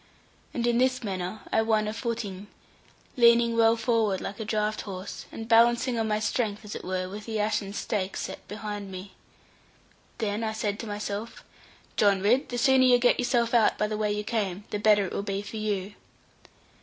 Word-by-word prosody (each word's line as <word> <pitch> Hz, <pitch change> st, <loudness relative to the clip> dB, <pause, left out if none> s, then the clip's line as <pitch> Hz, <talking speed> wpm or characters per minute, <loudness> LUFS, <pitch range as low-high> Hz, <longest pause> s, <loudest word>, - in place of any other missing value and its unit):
And 235 Hz, -, -2 dB
in 240 Hz, 0 st, +2 dB
this 255 Hz, 0 st, +2 dB
manner 190 Hz, 0 st, -4 dB
I 220 Hz, -, +3 dB
won 220 Hz, -1 st, +1 dB
a 215 Hz, -, -2 dB
footing, 220 Hz, -4 st, -4 dB, 0.7 s
leaning 235 Hz, -1 st, +5 dB
well 225 Hz, 0 st, +5 dB
forward 225 Hz, -4 st, +1 dB
like 205 Hz, -, -6 dB
a 220 Hz, -, -4 dB
draught 215 Hz, 0 st, -1 dB
horse, 190 Hz, -1 st, -7 dB
and 225 Hz, -, -7 dB
balancing 235 Hz, +1 st, +4 dB
on 220 Hz, -, 0 dB
my 210 Hz, 0 st, +1 dB
strength 215 Hz, -1 st, -1 dB
as 210 Hz, -, -7 dB
it -, -, -6 dB
were, 185 Hz, 0 st, -2 dB
with 205 Hz, +3 st, -8 dB
the 220 Hz, -1 st, -2 dB
ashen 210 Hz, -2 st, 0 dB
stake 200 Hz, -1 st, -2 dB
set -, -, -6 dB
behind 205 Hz, -1 st, -6 dB
me. 190 Hz, +1 st, -8 dB, 1.0 s
Then 215 Hz, -1 st, -2 dB
I 220 Hz, -1 st, -1 dB
said 215 Hz, -1 st, -2 dB
to 230 Hz, -, -6 dB
my 205 Hz, 0 st, -4 dB
self, 210 Hz, +2 st, -5 dB, 0.5 s
'John 200 Hz, -2 st, +4 dB
Ridd, 245 Hz, +6 st, +3 dB
the 245 Hz, -, -3 dB
sooner 260 Hz, +1 st, +5 dB
you 250 Hz, -1 st, +6 dB
get 245 Hz, 0 st, +3 dB
yourself 240 Hz, -1 st, +1 dB
out 230 Hz, -3 st, +4 dB
by 210 Hz, -, +1 dB
the 215 Hz, 0 st, -2 dB
way 210 Hz, -1 st, 0 dB
you 210 Hz, 0 st, -2 dB
came, 205 Hz, -3 st, -2 dB
the 210 Hz, -, -2 dB
better 210 Hz, -1 st, +4 dB
it -, -, -6 dB
will -, -, -1 dB
be 200 Hz, 0 st, -3 dB
for 220 Hz, -, -7 dB
you.' 205 Hz, -2 st, -2 dB
215 Hz, 200 wpm, -27 LUFS, 205-230 Hz, 1.0 s, you